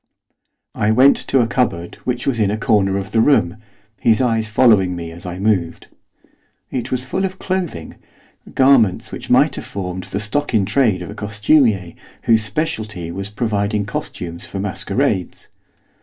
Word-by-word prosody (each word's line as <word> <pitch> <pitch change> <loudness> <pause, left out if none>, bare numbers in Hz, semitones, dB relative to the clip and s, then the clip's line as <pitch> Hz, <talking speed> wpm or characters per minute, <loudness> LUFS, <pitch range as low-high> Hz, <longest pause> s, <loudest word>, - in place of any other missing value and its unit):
I 105 - 0
went 130 +5 +6
to 135 - +3
a 115 - +1
cupboard 85 -10 -1
which 125 -1 -2
was 125 -4 0
in 105 -2 +2
a 105 - -1
corner 105 -5 +2
of 100 0 -5
the 110 - +3
room, 110 -8 +2 0.4
his 110 -2 +3
eyes 115 -3 +1
following 105 -5 +3
me 85 -1 -6
as 85 +2 -10
I 90 0 -5
moved. 95 -4 -1 0.8
It 125 - -3
was 130 0 -2
full 190 +9 -2
of 190 -1 -3
clothing, 180 - -4 0.6
garments 130 -8 +3
which - - -8
might - - +3
have - - -6
formed 95 -2 -5
the 100 - -4
stock 125 +5 -1
in 100 -3 +3
trade 105 -3 +1
of 85 - -8
a - - -7
costumier 105 - +1 0.3
whose 110 -2 +4
speciality 110 - -3
was 100 +3 -5
providing 105 -1 -1
costumes 85 -4 -6
for 100 - -6
masquerades. 100 0 -2
105 Hz, 165 wpm, -19 LUFS, 95-125 Hz, 0.8 s, went